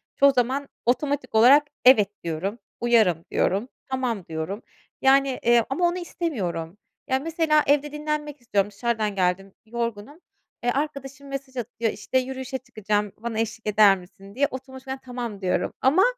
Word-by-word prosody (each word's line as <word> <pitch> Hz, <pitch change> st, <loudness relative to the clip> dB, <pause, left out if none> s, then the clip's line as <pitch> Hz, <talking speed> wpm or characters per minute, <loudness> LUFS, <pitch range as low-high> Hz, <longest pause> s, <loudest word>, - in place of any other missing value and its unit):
çoğu 280 Hz, 0 st, +6 dB
zaman 265 Hz, +2 st, 0 dB, 0.2 s
otomatik 255 Hz, 0 st, 0 dB
olarak 260 Hz, +7 st, +7 dB, 0.2 s
"Evet." 220 Hz, -6 st, +7 dB
diyorum, 175 Hz, +7 st, -3 dB, 0.2 s
"Uyarım." 215 Hz, -9 st, +3 dB
diyorum, 200 Hz, +6 st, +1 dB, 0.2 s
"Tamam." 245 Hz, -8 st, -2 dB
diyorum. 165 Hz, +7 st, -4 dB, 0.4 s
Yani, 270 Hz, -1 st, +4 dB
eee, 235 Hz, -1 st, +4 dB
ama 300 Hz, +7 st, +1 dB
onu 345 Hz, +1 st, -1 dB
istemiyorum. 205 Hz, -, -3 dB, 0.3 s
Ya, 260 Hz, -, +1 dB
mesela 315 Hz, 0 st, +2 dB
evde 290 Hz, +1 st, +2 dB
dinlenmek 300 Hz, -1 st, -4 dB
istiyorum, 205 Hz, -3 st, 0 dB
dışarıdan 215 Hz, -1 st, -1 dB
geldim 190 Hz, +1 st, 0 dB
yorgunum, 235 Hz, +4 st, -4 dB, 0.4 s
eee, 245 Hz, -, +2 dB
arkadaşım 275 Hz, -1 st, -4 dB
mesaj 275 Hz, -1 st, -6 dB
atıyor, 235 Hz, -1 st, -2 dB
işte, 260 Hz, -, -2 dB
"Yürüyüşe 260 Hz, 0 st, -4 dB
çıkacağım 210 Hz, -5 st, -2 dB
bana 225 Hz, 0 st, -4 dB
eşlik 225 Hz, 0 st, -3 dB
eder 210 Hz, -2 st, +6 dB
misin?" 195 Hz, +2 st, -15 dB
diye 280 Hz, +2 st, +3 dB
otomatikman 265 Hz, 0 st, -7 dB
"Tamam." 240 Hz, -5 st, -5 dB
diyorum 185 Hz, -1 st, 0 dB
ama 295 Hz, +9 st, +5 dB
245 Hz, 145 wpm, -25 LUFS, 210-275 Hz, 0.4 s, olarak